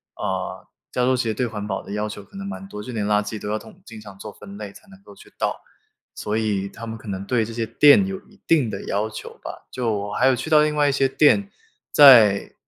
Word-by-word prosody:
呃， -, -, -4 dB, 0.3 s
加 125 Hz, -, 0 dB
州 130 Hz, +1 st, +3 dB
其 125 Hz, -, 0 dB
实 110 Hz, -1 st, -1 dB
对 125 Hz, -, -1 dB
环 105 Hz, -3 st, -5 dB
保 95 Hz, -, -3 dB
的 -, -, -10 dB
要 105 Hz, +1 st, -2 dB
求 105 Hz, -1 st, -8 dB
可 195 Hz, -, -15 dB
能 195 Hz, -, -6 dB
蛮 200 Hz, -1 st, -7 dB
多， 105 Hz, -, -7 dB
就 125 Hz, +2 st, -8 dB
连 105 Hz, -2 st, -2 dB
垃 105 Hz, 0 st, +2 dB
圾 105 Hz, +1 st, -6 dB
都 105 Hz, -, -5 dB
要 110 Hz, +1 st, -1 dB
统 110 Hz, -, -16 dB
经 115 Hz, -1 st, -11 dB
常 100 Hz, -2 st, -12 dB
做 105 Hz, +1 st, -9 dB
分 100 Hz, -1 st, -12 dB
类 105 Hz, -2 st, -7 dB
才 210 Hz, -, -18 dB
能 195 Hz, 0 st, -17 dB
够 -, -, -15 dB
去 -, -, -18 dB
倒， -, -, -1 dB, 0.6 s
所 105 Hz, +1 st, -3 dB
以 100 Hz, -3 st, -1 dB
他 115 Hz, +3 st, -10 dB
们 115 Hz, 0 st, -6 dB
可 110 Hz, -, -14 dB
能 95 Hz, -1 st, -5 dB
对 115 Hz, 0 st, +1 dB
这 115 Hz, -, -6 dB
些 115 Hz, -1 st, -2 dB
店 150 Hz, -, +5 dB
有 195 Hz, 0 st, -5 dB
一 205 Hz, -, -22 dB
定 150 Hz, -8 st, +3 dB
的 100 Hz, -2 st, -6 dB
要 105 Hz, +2 st, -1 dB
求 -, -, -10 dB
吧。 -, -, -9 dB
就 120 Hz, -3 st, -2 dB
我 105 Hz, -1 st, -3 dB
还 130 Hz, -, +2 dB
有 130 Hz, -, +4 dB
去 130 Hz, +6 st, -5 dB
到 150 Hz, -1 st, +6 dB
另 150 Hz, 0 st, +1 dB
外 145 Hz, -1 st, +3 dB
一 -, -, +3 dB
些 135 Hz, 0 st, +2 dB
店， 175 Hz, +9 st, +3 dB, 0.4 s
在 115 Hz, -9 st, +7 dB
110 Hz, 290 characters per minute, -22 LUFS, 105-135 Hz, 0.6 s, 在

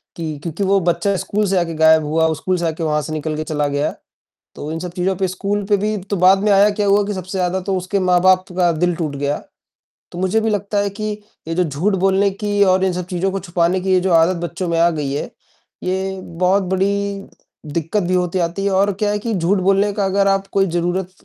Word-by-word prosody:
की 155 Hz, -3 st, -4 dB
क्योंकि 170 Hz, +4 st, -3 dB
वो 195 Hz, +1 st, +3 dB
बच्चा 195 Hz, +4 st, 0 dB
स्कूल 210 Hz, +2 st, 0 dB
से 195 Hz, -, +1 dB
आके 165 Hz, -1 st, -2 dB
गायब 160 Hz, 0 st, +6 dB
हुआ 160 Hz, +1 st, +1 dB
स्कूल 185 Hz, +4 st, -1 dB
से 170 Hz, -, -2 dB
आके 160 Hz, +1 st, -3 dB
वहाँ 150 Hz, -1 st, +1 dB
से 155 Hz, +2 st, -6 dB
निकल 155 Hz, 0 st, -3 dB
के 155 Hz, -, -3 dB
चला 150 Hz, -2 st, -1 dB
गया। 145 Hz, +1 st, -1 dB, 0.6 s
तो 150 Hz, +2 st, -6 dB
इन 165 Hz, -, -4 dB
सब 180 Hz, 0 st, -6 dB
चीज़ों 185 Hz, +1 st, -1 dB
पे 190 Hz, +1 st, 0 dB
स्कूल 200 Hz, +3 st, -2 dB
पे 205 Hz, -, +4 dB
भी 210 Hz, +2 st, -1 dB
तो 200 Hz, -, 0 dB
बाद 185 Hz, +2 st, +5 dB
में 210 Hz, -, +3 dB
आया 200 Hz, +1 st, +5 dB
क्या 205 Hz, -, +2 dB
हुआ 200 Hz, +1 st, +4 dB
कि 205 Hz, -, -2 dB
सबसे 185 Hz, +1 st, -5 dB
ज़्यादा 180 Hz, +1 st, 0 dB
तो 190 Hz, +1 st, -2 dB
उसके 185 Hz, +2 st, -2 dB
माँ-बाप 185 Hz, 0 st, +3 dB
का 175 Hz, -2 st, +3 dB
दिल 175 Hz, +2 st, 0 dB
टूट 155 Hz, -4 st, -3 dB
गया। 145 Hz, +1 st, -1 dB, 0.8 s
तो 175 Hz, -, -7 dB
मुझे 190 Hz, +4 st, +1 dB
भी 220 Hz, -, 0 dB
लगता 205 Hz, 0 st, -1 dB
है 200 Hz, 0 st, 0 dB
कि 215 Hz, +1 st, -4 dB, 0.4 s
ये 165 Hz, -, -2 dB
जो 180 Hz, -, +2 dB
झूठ 165 Hz, +7 st, -1 dB
बोलने 195 Hz, +1 st, +3 dB
की 205 Hz, +1 st, -1 dB
और 190 Hz, 0 st, +3 dB
इन 185 Hz, -, +1 dB
सब 180 Hz, 0 st, -3 dB
चीज़ों 180 Hz, +1 st, -1 dB
को 195 Hz, -, -3 dB
छुपाने 175 Hz, 0 st, 0 dB
की 190 Hz, +1 st, -1 dB
ये 185 Hz, -, +4 dB
जो 185 Hz, -1 st, 0 dB
आदत 165 Hz, +2 st, +4 dB
बच्चों 175 Hz, +1 st, -4 dB
में 165 Hz, -, 0 dB
आ 170 Hz, -, +5 dB
गई 145 Hz, -4 st, -3 dB
है, 145 Hz, -, -3 dB, 0.5 s
ये 190 Hz, +1 st, -2 dB
बहुत 185 Hz, +4 st, +1 dB
बड़ी 200 Hz, +1 st, 0 dB, 0.5 s
दिक्कत 170 Hz, +6 st, -1 dB
भी 180 Hz, +1 st, -1 dB
होती 180 Hz, 0 st, 0 dB
आती 175 Hz, +3 st, -2 dB
है 200 Hz, -, +1 dB
और 200 Hz, +2 st, +2 dB
क्या 205 Hz, -, +2 dB
है 210 Hz, -, 0 dB
कि 225 Hz, +1 st, -3 dB
झूठ 185 Hz, +3 st, +1 dB
बोलने 195 Hz, +2 st, +2 dB
का 200 Hz, 0 st, -1 dB
अगर 195 Hz, +1 st, +2 dB
आप 195 Hz, 0 st, +1 dB
कोई 195 Hz, 0 st, +3 dB
ज़रूरत 175 Hz, +2 st, -1 dB
185 Hz, 245 wpm, -19 LUFS, 170-195 Hz, 0.8 s, गायब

